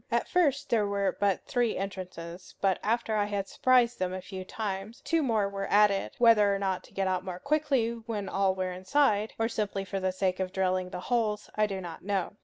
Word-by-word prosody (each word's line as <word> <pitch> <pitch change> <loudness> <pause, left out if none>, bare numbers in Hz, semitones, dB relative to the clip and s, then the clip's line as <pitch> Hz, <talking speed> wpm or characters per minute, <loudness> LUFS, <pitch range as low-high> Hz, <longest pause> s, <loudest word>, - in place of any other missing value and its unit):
At - - 0
first 290 -6 +1
there 215 -3 +3
were 200 -2 0
but 200 -2 +1
three 245 -3 0
entrances; 185 -2 -7
but 195 -2 +2
after 225 0 0
I 205 -1 +2
had 200 -1 -2
surprised 245 0 +3
them 185 0 -1
a - - -4
few 185 0 -7
times, 200 +2 -5
two 330 -1 +1
more 225 -7 +1
were 195 0 -4
added; 205 -1 +3
whether 210 -4 +5
to 190 -2 -3
get 195 -1 0
out 185 -1 0
more 185 -2 -5
quickly 280 -1 +1 0.2
when 210 -4 -3
all 195 0 +1
were 185 -1 -2
inside, 210 +3 +1
or 225 - +1
simply 205 -4 -2
for 195 0 -3
the 185 0 0
sake 185 0 -1
of 185 -1 -2
drilling 185 -1 0
the 180 - -6
holes, 215 -2 -1
I 215 0 +2
do 195 -2 -4
not 175 -3 -8
know. 195 -1 -1
200 Hz, 205 wpm, -29 LUFS, 185-225 Hz, 0.2 s, whether